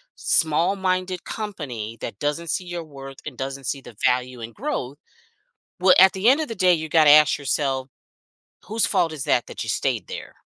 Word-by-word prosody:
small-minded 185 +3 0
company 130 - -6
that 100 - -6
doesn't 150 +3 -2
see 180 - -2
your 175 -1 -5
worth 135 -3 -10
and 140 -5 -7
doesn't 135 0 -5
see 135 - -2
the 120 - -13
value 125 -1 0
in 115 +1 -7
growth, 145 - -4 0.8
well, 185 0 +6
at 190 0 +8
the 195 +4 0
end 285 +4 +4
of 305 - -4
the 225 - -5
day, 185 -1 +4
you 160 -1 -2
gotta 155 -2 +6
ask 150 0 +6
yourself, 135 -1 -1 0.8
whose 220 +4 +1
fault 175 -5 +1
is 145 -4 -5
that 120 - +1
that - - -6
you - - -8
stayed - - -1
there? - - -8
155 Hz, 190 wpm, -23 LUFS, 135-185 Hz, 0.8 s, at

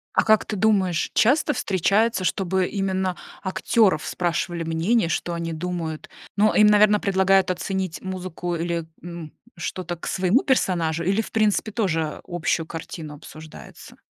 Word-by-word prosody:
А - - +4
как 215 -1 +4
ты - - -4
думаешь, 190 -5 +1
часто 295 +5 +3
встречается, 200 - +1
чтобы 185 +1 0
именно 190 -2 -1 0.3
актеров 190 -3 +2
спрашивали 175 -1 -2
мнение, 165 +7 +1
что 175 +1 -2
они 170 -1 -3
думают? 165 -1 -4 0.3
Но, 210 +1 +3
им, 210 - +6
наверно, 210 0 +5
предлагают 190 -1 +3
оценить 185 -1 -3
музыку 185 -2 -4
или, 170 0 -2 0.2
м, 170 -3 -8 0.3
что-то 180 -1 -4
к 170 - -8
своему 190 +8 +2
персонажу, 170 - +1
или 195 +5 +1
в - - -10
принципе 215 0 +1
тоже 165 -8 -1
общую 175 -1 -1
картину 160 -2 -7
обсуждается? 155 +1 -12
185 Hz, 140 wpm, -23 LUFS, 170-205 Hz, 0.3 s, им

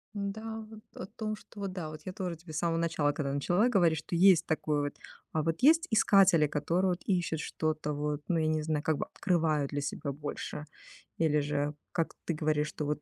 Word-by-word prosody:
Н-да, 220 +2 -4
вот 220 -1 -11
о - - -6
том, 215 +2 -4
что 210 - -15
вот 195 -2 -3
да 175 -4 -4
вот, 155 0 -9
я 185 - -5
тоже 180 -3 -4
тебе 160 0 -12
с - - -3
самого 165 +1 +1
начала, 165 -3 +1
когда 140 -2 -3
начала 175 - +2
говорить, 175 -8 +3
что 175 - -5
есть 175 -1 +6
такой 155 -2 0
вот, 145 0 -3 0.4
а, 155 - +1
вот 165 +1 -1
есть 320 +5 +5
искатели, 195 -7 +5
которые 170 +6 +1
вот 175 - -3
ищут 175 -4 0
что-то 155 -1 -2
вот, 150 0 -2
ну, 175 - +1
я 155 - +1
не 155 0 +1
знаю, 155 -1 -1
как 160 -2 +1
бы - - -2
открывают 160 -6 0
для 145 -1 -2
себя 145 0 -3
больше. 145 +1 -5 0.5
Или 150 -2 +3
же, 145 0 -1 0.2
как 165 -2 -1
ты 170 - 0
говоришь, 150 -1 0
что 150 - -4
вот 150 +1 -2
160 Hz, 215 wpm, -30 LUFS, 150-185 Hz, 0.5 s, есть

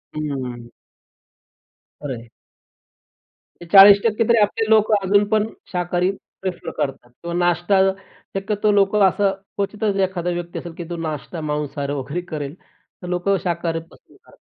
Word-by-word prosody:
हं. 130 -6 -4 1.3
खरं 135 -4 -4
आहे. 115 0 -15 1.3
ते - - -8
40% 205 +3 +8
तरी 235 - +5
आपले 215 +2 +1
लोक 220 -1 +4
अजूनपण 205 +2 +2 0.2
शाकाहारी 180 0 0 0.3
प्रिफर 185 -1 -4
करतात. 135 -3 -3
किंवा 170 +7 -8
नाश्ता 175 +2 +2 0.6
शक्यतो 210 +2 0
लोक 200 0 +3
असं 195 0 +3 0.3
क्वचितच 205 0 -1
एखादा 180 -2 -3
व्यक्ती 175 0 -6
असेल, 170 -1 -8
की 175 - -5
तो 175 - -4
नाश्ता 155 +3 -6
मांसाहार 145 -1 -3
वगैरे 150 +6 -4
करेल. 145 -1 -4 0.5
तर 180 - -7
लोक 180 +2 -2
शाकाहारी 170 -2 -1
पसंद - - -21
कर - - -20
180 Hz, 135 wpm, -21 LUFS, 155-200 Hz, 1.3 s, 40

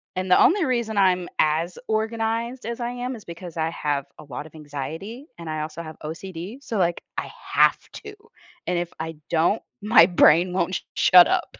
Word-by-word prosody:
And 185 0 -3
the - - +6
only 365 -1 +4
reason 235 -4 -1
I'm 185 -2 +3
as 160 +3 +1
organized 225 +2 -2
as 235 +1 -4
I 240 0 -2
am 245 +1 -4
is 215 - -12
because 170 0 -9
I 160 0 0
have 145 -4 -2
a - - -10
lot 145 +1 -7
of - - -20
anxiety 160 - -7
and 165 -2 -7
I 155 0 -3
also 160 +2 -6
have 155 -1 -9
OCD, 180 - -7
so, 230 -6 -4
like, 175 -1 0 0.2
I - - -6 0.2
have - - +5 0.2
to, 420 -1 -9 0.5
and 180 - 0
if 175 -1 -4
I 160 0 -5
don't, 170 +6 +2 0.2
my 210 -5 +7
brain 175 0 +5
won't 185 0 -1
shut 180 -1 +7
up. - - -1
180 Hz, 190 wpm, -24 LUFS, 160-225 Hz, 0.5 s, my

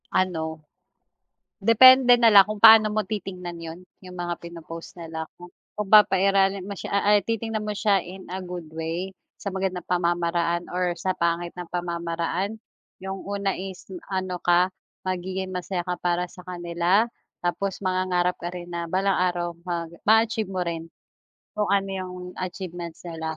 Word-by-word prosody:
Ano, 160 -4 -1 1.0
depende 250 +2 +8
na 230 -2 +5
lang 200 -1 +8
kung 215 - -3
paano 220 0 +9
mo 215 0 -1
titingnan 185 -4 -5
yun 165 0 -7 0.2
yung 185 -1 -11
mga 175 -1 -4
pinopost 165 0 -9
nila 160 -2 -6
kung 175 0 -13 0.4
papairalin 195 -1 +5
mo 200 - -6
siya 200 +1 -3
a - - +3
ay 205 - +6
titingnan 225 -1 -1
mo 210 -1 -3
siya 200 -1 +3
in 185 +1 -10
a 190 - -3
good 180 -2 -7
way 165 +4 -3 0.2
sa 200 - -5
magandang 190 -2 -2
pamamaraan 170 -1 0
or 180 -1 0
sa 185 +2 -1
pangit 170 0 -1
na 175 - -7
pamamaraan. 170 +3 -2 0.5
Yung 190 0 -4
una 200 -1 -1
is 190 0 -7 0.2
ano 185 -2 -3
ka 180 +1 +3 0.3
magiging 185 +1 -3
masaya 180 0 -3
ka 180 -1 -4
para 175 0 0
sa 180 +1 -12
kanila 175 +3 +1 0.4
tapos 195 +3 -2
mangangarap 185 -1 +1
ka 175 - -3
rin 175 -1 -8
na 170 0 -3
balang 190 +2 +1
araw 175 -1 0 0.2
ma 170 -1 -1 0.2
maa-achieve 220 0 +4
mo 185 -1 -2
rin 165 -1 -4 0.7
kung 210 -1 0
ano 195 -1 +2
yung 185 -1 -5 0.3
achievements 175 -2 -6
nila 160 -1 -4
180 Hz, 155 wpm, -25 LUFS, 175-195 Hz, 1.0 s, paano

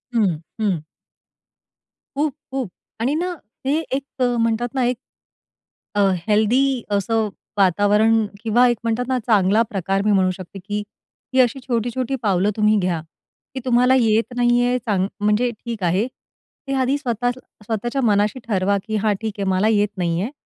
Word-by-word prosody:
हं, 205 -6 +3 0.3
हं. 200 -6 +1 1.4
खूप-खूप 270 -5 -3 0.3
आणि 245 +5 +1
ना 355 +3 -1 0.3
ते 280 +3 +2 0.2
एक 275 -1 -6
म्हणतात 240 -1 +1
ना 260 - +2
1 245 0 0 1.0
अ, - - +1 0.3
हेल्दी 240 +5 +3
असं 215 +2 +1 0.3
वातावरण 210 +4 +4 0.2
किंवा 235 +2 +4
एक 240 -1 +1
म्हणतात 230 +2 -1
ना, 260 -1 +1
चांगला 215 -2 +3
प्रकार 195 0 -1
मी 215 - +3
म्हणू 190 -2 +3
शकते 185 +1 -9
की 205 +1 -3 0.5
ही 260 - +3
अशी 255 +2 +1
छोटी-छोटी 245 +2 -1
पावलं 195 -1 +2
तुम्ही 215 0 +3
घ्या 180 -3 0 0.5
की 260 - -4
तुम्हाला 250 +1 +4
येत 225 +1 +2
नाही 245 0 +3
आहे 250 +1 +2
चांग 205 -5 0
म्हणजे 210 +4 +2
ठीक 230 -2 -7
आहे. 185 +6 +2 0.6
ते 275 - -1
आधी 260 +2 +2
स्वत 245 -4 -3 0.4
स्वतःच्या 235 +5 -2
मनाशी 210 +1 +2
ठरवा 200 -2 +1
की 220 - -2
हा 215 - +3
ठीक 220 -2 -3
आहे - - 0
मला 190 +3 +2
येत 210 -2 +3
नाही 170 -1 0
आहे. 225 +7 -3
225 Hz, 155 wpm, -21 LUFS, 205-245 Hz, 1.4 s, वातावरण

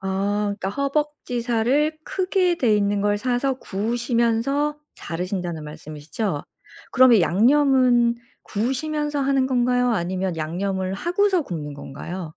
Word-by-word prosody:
아. 200 +2 -1
그러니까 190 - -3
허벅지 280 -2 -2
살을 265 +7 +1
크게 365 -2 +1
돼 225 -8 +3
있는 205 0 +1
걸 205 0 +1
사서 255 +3 0
구우시면서 235 +7 0 0.2
자르신다는 175 -2 -4
말씀이시죠. 150 +4 -5 0.5
그러면 255 -5 +6
양념은 245 - +4 0.3
구우시면서 290 +6 -2
하는 270 -1 +2
건가요, 250 -1 +2
아니면 185 -1 -2
양념을 185 +4 -2
하고서 360 - +1
굽는 150 - -6
건가요? 160 +5 -7
235 Hz, 305 characters per minute, -23 LUFS, 190-275 Hz, 0.5 s, 그러면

